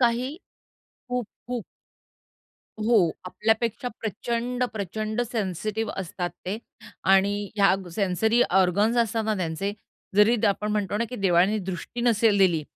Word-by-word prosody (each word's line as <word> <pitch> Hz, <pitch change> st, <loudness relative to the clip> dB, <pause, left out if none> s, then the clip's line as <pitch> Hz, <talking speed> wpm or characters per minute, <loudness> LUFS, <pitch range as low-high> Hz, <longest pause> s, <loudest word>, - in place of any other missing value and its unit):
काही 250 Hz, +4 st, +1 dB, 0.7 s
खूप, 250 Hz, -3 st, -2 dB, 0.2 s
खूप. 245 Hz, -4 st, -3 dB, 1.2 s
हो, 230 Hz, +1 st, +4 dB, 0.3 s
आपल्यापेक्षा 225 Hz, +5 st, 0 dB
प्रचंड, 235 Hz, +3 st, -2 dB
प्रचंड 215 Hz, +3 st, -3 dB
सेन्सिटिव्ह 215 Hz, +1 st, -2 dB
असतात 175 Hz, -1 st, -3 dB, 0.2 s
ते 200 Hz, +4 st, -2 dB, 0.5 s
आणि 200 Hz, +1 st, +2 dB
ह्या 195 Hz, -2 st, +5 dB, 0.2 s
सेन्सरी 220 Hz, +4 st, +2 dB
ऑर्गन्स 190 Hz, +5 st, +3 dB
असता 225 Hz, 0 st, -1 dB
ना 215 Hz, 0 st, 0 dB
त्यांचे 185 Hz, +2 st, -2 dB, 0.4 s
जरी 215 Hz, +3 st, +6 dB
आपण 210 Hz, +1 st, 0 dB
म्हणतो 205 Hz, -1 st, -1 dB
ना 230 Hz, -, +1 dB
की 250 Hz, -, -5 dB
देवाने 190 Hz, +3 st, +3 dB
दृष्टी 190 Hz, +4 st, -5 dB
नसेल 225 Hz, -3 st, +3 dB
दिली, 175 Hz, -5 st, +4 dB
210 Hz, 120 wpm, -25 LUFS, 195-230 Hz, 1.2 s, जरी